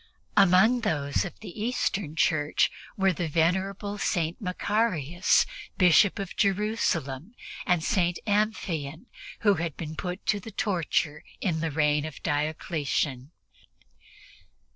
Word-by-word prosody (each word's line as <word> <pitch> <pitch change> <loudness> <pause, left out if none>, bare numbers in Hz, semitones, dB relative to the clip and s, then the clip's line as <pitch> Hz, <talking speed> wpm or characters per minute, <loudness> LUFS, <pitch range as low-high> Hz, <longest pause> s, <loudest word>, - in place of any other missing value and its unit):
Among 200 +5 +5
those 145 -9 0
of 175 - -8
the 210 0 -8
Eastern 205 -8 -1
Church 150 -2 +2 0.3
were 195 -1 +3
the 175 0 -2
venerable 190 +6 0
St. 170 -1 -1
Macarius, 180 -4 +1 0.3
Bishop 180 +2 +5
of 195 -3 -5
Jerusalem, 195 - 0 0.3
and 175 -3 +2
St. 175 -4 +1
Amphion, 200 - -1 0.4
who 205 -2 +5
had 165 -4 -3
been 160 -1 -6
put 180 +3 -5
to 205 - +1
the 210 - -9
torture 170 -7 -1 0.2
in 170 -5 -1
the 165 0 -1
reign 150 -1 +2
of 155 -3 -9
Diocletian. 145 -3 -1
175 Hz, 120 wpm, -27 LUFS, 155-205 Hz, 0.4 s, Among